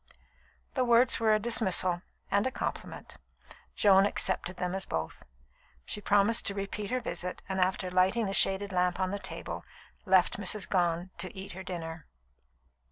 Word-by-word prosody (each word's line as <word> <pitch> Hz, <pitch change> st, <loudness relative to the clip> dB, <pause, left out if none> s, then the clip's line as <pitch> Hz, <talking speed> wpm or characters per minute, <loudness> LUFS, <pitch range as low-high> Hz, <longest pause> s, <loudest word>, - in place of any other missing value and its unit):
The 260 Hz, -, +1 dB
words 240 Hz, +1 st, +4 dB
were 225 Hz, -1 st, +3 dB
a 215 Hz, -, +5 dB
dismissal 195 Hz, -6 st, +2 dB, 0.3 s
and 200 Hz, +4 st, +2 dB
a -, -, -2 dB
compliment. -, -, -6 dB, 0.6 s
Joan 195 Hz, -1 st, +5 dB
accepted 180 Hz, -2 st, 0 dB
them 180 Hz, 0 st, -2 dB
as 190 Hz, 0 st, -3 dB
both. 80 Hz, 0 st, -4 dB, 0.6 s
She 210 Hz, -, -2 dB
promised 205 Hz, +3 st, +3 dB
to 200 Hz, -, -2 dB
repeat 200 Hz, +1 st, -4 dB
her 255 Hz, +1 st, 0 dB
visit, 180 Hz, -6 st, -5 dB
and 190 Hz, -1 st, -1 dB
after 185 Hz, 0 st, 0 dB
lighting 185 Hz, +5 st, +2 dB
the 195 Hz, -, -3 dB
shaded 195 Hz, +1 st, +2 dB
lamp 180 Hz, 0 st, +1 dB
on 185 Hz, 0 st, 0 dB
the 200 Hz, -, -3 dB
table, -, -, -6 dB, 0.4 s
left 185 Hz, 0 st, +3 dB
Mrs. 205 Hz, 0 st, +1 dB
Gone 175 Hz, -1 st, 0 dB
to 185 Hz, -, -4 dB
eat 190 Hz, +1 st, -6 dB
her 190 Hz, -, -8 dB
dinner. 165 Hz, -3 st, -7 dB
190 Hz, 165 wpm, -30 LUFS, 180-205 Hz, 0.6 s, a